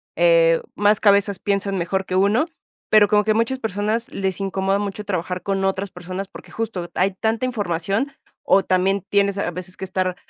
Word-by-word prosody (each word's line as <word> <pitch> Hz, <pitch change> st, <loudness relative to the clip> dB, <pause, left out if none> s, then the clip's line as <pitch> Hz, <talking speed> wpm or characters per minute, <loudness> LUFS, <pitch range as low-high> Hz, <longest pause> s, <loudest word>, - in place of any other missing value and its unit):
eh, -, -, +4 dB
más 205 Hz, 0 st, +3 dB
cabezas 200 Hz, -1 st, +3 dB
piensan 200 Hz, -1 st, -1 dB
mejor 190 Hz, +2 st, -1 dB
que 185 Hz, -, -3 dB
uno, 205 Hz, -, +3 dB, 0.4 s
pero, 210 Hz, -1 st, +6 dB
como 210 Hz, 0 st, +3 dB
que 215 Hz, -, +3 dB
muchas 230 Hz, +4 st, 0 dB
personas 215 Hz, +2 st, -1 dB
les 190 Hz, -1 st, -2 dB
incomoda 195 Hz, 0 st, 0 dB
mucho 205 Hz, +1 st, -4 dB
trabajar 185 Hz, -2 st, -3 dB
con 195 Hz, -1 st, -1 dB
otras 195 Hz, 0 st, -1 dB
personas, 185 Hz, +2 st, -6 dB
porque, -, -, -13 dB
justo, 200 Hz, -7 st, -4 dB
hay 195 Hz, +2 st, +2 dB
tanta 225 Hz, +3 st, 0 dB
información, 205 Hz, -, -1 dB, 0.3 s
o 195 Hz, 0 st, +4 dB
también 190 Hz, +1 st, +1 dB
tienes, 200 Hz, -1 st, +2 dB
a 175 Hz, -, -1 dB
veces, 180 Hz, +1 st, -7 dB
que -, -, -9 dB
estar 185 Hz, -1 st, -1 dB
200 Hz, 180 wpm, -21 LUFS, 185-215 Hz, 0.4 s, pero